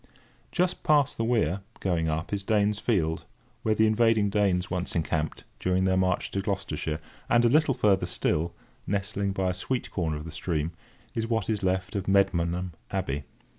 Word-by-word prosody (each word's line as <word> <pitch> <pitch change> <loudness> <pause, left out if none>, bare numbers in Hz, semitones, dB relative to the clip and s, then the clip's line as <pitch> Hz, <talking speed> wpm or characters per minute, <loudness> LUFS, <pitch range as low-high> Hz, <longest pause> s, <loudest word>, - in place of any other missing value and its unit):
Just 180 0 0
past 145 -2 +3
the 115 - -1
weir 110 -6 +1 0.2
(going 85 -4 0
up) 80 +5 -2
is 100 - 0
Danes' 105 0 +2
Field, 80 -10 0 0.4
where 110 -1 +2
the 110 - +4
invading 110 -2 +3
Danes 95 -3 +1
once 90 0 -2
encamped, 80 -2 -1 0.2
during 90 0 +1
their 95 0 +3
march 95 -1 +1
to 100 - -1
Gloucestershire; 95 -6 -2 0.3
and 120 0 +5
a - - +6
little 150 0 +4
further 105 -6 +3
still, 85 +3 0 0.3
nestling 100 0 -1
by 95 -1 0
a - - -3
sweet 120 +7 -2
corner 80 -5 -1
of 75 - -7
the 80 - -7
stream, 80 0 -1 0.4
is 115 0 -1
what 115 -2 0
is 105 -2 -1
left 95 0 0
of 100 -1 -2
Medmenham 90 -2 +2 0.2
Abbey. 75 -7 -2
95 Hz, 175 wpm, -27 LUFS, 85-110 Hz, 0.4 s, a